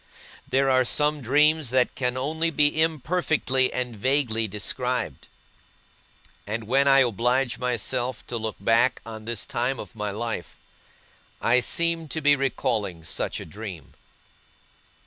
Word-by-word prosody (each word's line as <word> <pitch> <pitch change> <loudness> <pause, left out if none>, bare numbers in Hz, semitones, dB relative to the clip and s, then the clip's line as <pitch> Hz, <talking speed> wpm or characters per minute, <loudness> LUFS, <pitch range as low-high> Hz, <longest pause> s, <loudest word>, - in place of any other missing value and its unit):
There 135 +1 +2
are 130 -1 +4
some 150 +4 +1
dreams 150 +3 +3
that 125 0 +2
can 125 -1 -2
only 160 +5 -1
be 150 0 +2
imperfectly 155 -4 +1
and 125 -2 -3
vaguely 115 -1 0
described; 115 - -3 1.2
and 110 +2 -3
when 135 +5 +2
I 135 0 +7
oblige 125 +2 +1
myself 125 0 -2
to 120 - -4
look 110 -2 -3
back 115 +5 +2
on 110 -1 -8
this 115 -2 -2
time 125 +3 -1
of - - -9
my 105 -1 -3
life, 110 -3 -5 0.8
I 120 +2 +4
seem 165 +5 0
to 160 - -3
be 145 -1 +4
recalling 115 -10 -1
such 80 - -2
a - - -7
dream. 95 -5 -9
125 Hz, 135 wpm, -25 LUFS, 115-140 Hz, 1.2 s, I